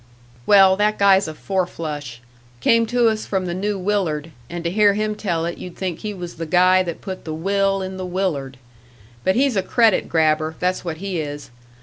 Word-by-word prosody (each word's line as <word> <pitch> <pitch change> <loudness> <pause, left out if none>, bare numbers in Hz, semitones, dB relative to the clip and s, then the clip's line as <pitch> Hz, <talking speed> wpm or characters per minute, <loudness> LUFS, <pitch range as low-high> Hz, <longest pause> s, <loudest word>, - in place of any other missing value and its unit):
"Well, 195 -2 +7
that 210 +1 +1
guy's 195 -2 +4
a 155 - -6
four 190 +2 -1
flush. 145 -8 -6 0.4
Came 230 - +3
to 240 0 +2
us 220 -1 -1
from 190 -2 -1
the 175 - -3
New 200 +3 -2
Willard, 180 -6 -1 0.2
and 175 0 -5
to 170 - -1
hear 205 0 +4
him 215 0 -1
tell 175 -6 -2
it 170 - -4
you'd 180 -1 -8
think 180 -3 -4
he 215 - -4
was 175 -4 -8
the 165 0 -5
guy 185 +3 +4
that 170 -3 -5
put 190 -2 -7
the 155 -1 -5
"will" 195 +3 0
in 190 0 -6
the 185 - -4
Willard. 160 -8 -2 0.7
But 190 - +2
he's 265 -1 +2
a 195 - +2
credit 225 +1 +2
grabber, 155 -1 +1
that's 180 +1 -1
what 165 -3 -4
he 190 -1 -3
is. 145 -3 -6
185 Hz, 210 wpm, -21 LUFS, 165-200 Hz, 0.7 s, Well